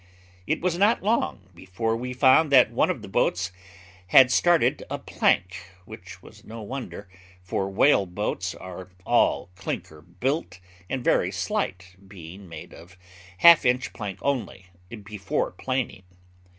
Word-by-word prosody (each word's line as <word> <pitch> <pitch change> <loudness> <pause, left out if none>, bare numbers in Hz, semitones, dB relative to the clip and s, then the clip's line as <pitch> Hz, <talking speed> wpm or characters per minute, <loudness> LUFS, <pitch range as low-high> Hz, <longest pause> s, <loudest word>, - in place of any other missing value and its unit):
It - - -1
was 175 0 -1
not 205 +2 +3
long 150 - -1
before 95 +6 -3
we 125 +2 -5
found 130 +4 +4
that 130 -3 +6
one - - +1
of - - -3
the - - -8
boats 95 +1 0 0.6
had 130 +6 +6
started 175 +4 +2
a - - -3
plank, 90 +1 0 0.3
which - - -12
was - - -16
no 115 0 -9
wonder, 120 -3 -7 0.4
for 95 +2 -2
whale 100 0 +3
boats 90 -1 -3
are 95 0 -10 0.2
all - - +1
clinker 80 -4 -6
built, 95 - -3 0.3
and 130 -2 -3
very - - +2
slight, 95 0 -4
being 95 0 -12
made 80 -2 -10
of 85 +1 -15 0.4
half 170 - +7
inch 125 0 0
plank 100 -3 -6
only, 110 -9 -3 0.3
before 100 -2 -3
planing. 130 0 -3
100 Hz, 140 wpm, -25 LUFS, 90-130 Hz, 0.6 s, half